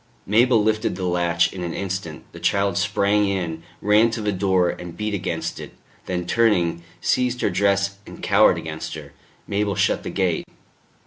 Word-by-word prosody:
Mabel 115 +2 +4
lifted 110 -1 0
the 95 0 -4
latch 85 -1 +1
in 95 - -6
an 85 -1 -4
instant; 95 -5 -4
the - - -11
child 100 -2 +1
sprang 100 +3 +2
in, 85 -5 -2 0.2
ran 105 +3 +5
to 115 0 -4
the 105 -1 0
door 95 -2 +2
and 85 -1 -9
beat 105 0 -2
against 90 -4 -3
it, - - -9 0.3
then 90 -1 -2
turning, 90 -6 +2 0.2
seized 125 -1 +1
her - - +1
dress 100 +1 +1
and - - -11
cowered - - +5
against - - -6
her. - - -10 0.3
Mabel 100 0 -1
shut 100 +1 +1
the - - -5
gate. 90 -4 0
100 Hz, 175 wpm, -22 LUFS, 90-105 Hz, 0.3 s, ran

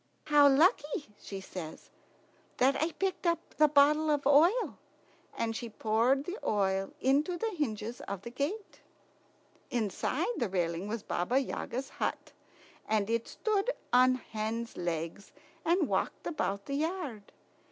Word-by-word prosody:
"How 295 -2 +6
lucky," 295 - +2
she 195 - -7
says, 180 -4 -8 0.7
"that 265 +2 +4
I 320 +2 +1
picked 380 -2 -1
up 335 -1 -1
the 305 - +6
bottle 300 +2 +4
of 290 -2 +1
oil!" 330 - +4 0.6
and 225 -1 -1
she 235 0 -4
poured 230 +5 +2
the 370 +7 -5
oil 195 -2 +1
into 295 +7 +2
the 450 +4 -1
hinges 235 - -3
of 200 -1 -5
the 235 - -7
gates. 310 - -4 0.9
Inside 220 -5 -1
the 235 -5 0
railing 175 0 -1
was 220 0 -4
Baba 180 +9 0
Yaga's 265 -1 -2
hut, - - -3 0.6
and 215 0 +1
it 230 0 0
stood 430 +1 0 0.2
on 255 +1 +6
hen's 230 -1 -4
legs 170 +2 -4 0.3
and 340 -1 +2
walked - - -1
about 200 -10 -2
the 275 - -2
yard. 300 - -3
255 Hz, 140 wpm, -31 LUFS, 215-305 Hz, 0.9 s, How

